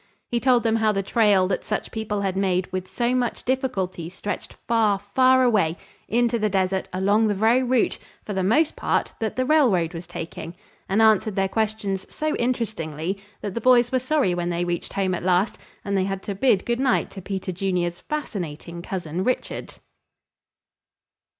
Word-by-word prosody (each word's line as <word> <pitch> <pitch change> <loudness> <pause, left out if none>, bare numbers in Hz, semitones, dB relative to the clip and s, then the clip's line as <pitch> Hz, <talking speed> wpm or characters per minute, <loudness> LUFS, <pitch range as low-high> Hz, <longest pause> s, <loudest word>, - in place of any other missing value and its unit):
He 240 - +1
told 250 -1 +3
them 225 -1 +2
how 220 -1 +3
the 195 -1 -1
trail 200 -3 +3
that 190 - -1
such 215 - -3
people 215 -2 -2
had 190 -2 -1
made 185 -2 +1
with 185 0 -3
so 235 +6 0
much 250 -2 -1
difficulty 195 - -2
stretched 205 +3 -5
far, 220 -3 +3
far 255 +6 +3
away 195 -9 +2 0.3
into 235 +1 +1
the 215 0 +1
desert 190 -1 0
along 200 +4 +2
the 205 - +1
very 225 +5 +3
route, 255 -2 +1 0.3
for 210 - -4
the 190 - 0
most 290 - +2
part, - - 0
that 220 -1 -2
the 255 - 0
railroad 240 - +3
was 170 0 -7
taking, 170 0 -7 0.3
and 210 +3 +3
answered 215 -1 +4
their 195 0 +2
questions 210 -2 -2
so 310 0 -1
interestingly 195 -8 -2 0.2
that 205 - -4
the 235 - -3
boys 245 -1 +5
were 260 - +2
sorry 255 -7 +1
when 175 0 -2
they 175 0 -1
reached 175 -1 -3
home 190 -2 0
at 180 - -2
last 185 +3 +1 0.3
and 200 -1 -1
they 190 -1 +2
had 195 0 -3
to 200 - -3
bid 200 -1 +2
good 240 0 0
night 260 -2 +1
to 195 - -8
Peter 190 0 -4
Junior's 180 -1 -1
fascinating 170 - -5
cousin, 175 -1 -3
Richard. 255 +4 -2
200 Hz, 180 wpm, -24 LUFS, 185-235 Hz, 0.3 s, boys